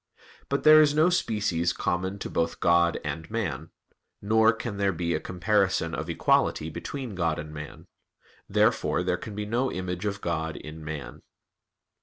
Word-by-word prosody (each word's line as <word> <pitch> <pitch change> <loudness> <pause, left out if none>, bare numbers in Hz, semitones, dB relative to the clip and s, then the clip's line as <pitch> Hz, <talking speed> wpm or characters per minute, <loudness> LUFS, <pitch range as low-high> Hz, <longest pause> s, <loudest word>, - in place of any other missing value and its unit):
But 140 - -1
there 155 0 +9
is 150 -1 +3
no 160 +4 +4
species 100 - 0
common 95 +2 -2
to - - -6
both 85 0 -1
God 85 0 +3
and 80 0 -4
man; 100 -12 -3 0.5
nor 110 +2 +4
can 115 -2 -5
there 100 -1 +2
be 85 -2 -2
a 80 - 0
comparison 90 -2 0
of 80 +1 -4
equality 80 -1 +1
between 120 - -6
God 85 -4 0
and 75 0 -7
man. 75 -1 -9 0.6
Therefore - - +2
there 90 0 +1
can 105 +3 -8
be 105 0 -3
no 120 +5 0
image 90 +1 -4
of 100 -1 -2
God 80 -3 -2
in 80 +1 -9
man. 75 -2 -7
90 Hz, 165 wpm, -27 LUFS, 80-110 Hz, 0.6 s, there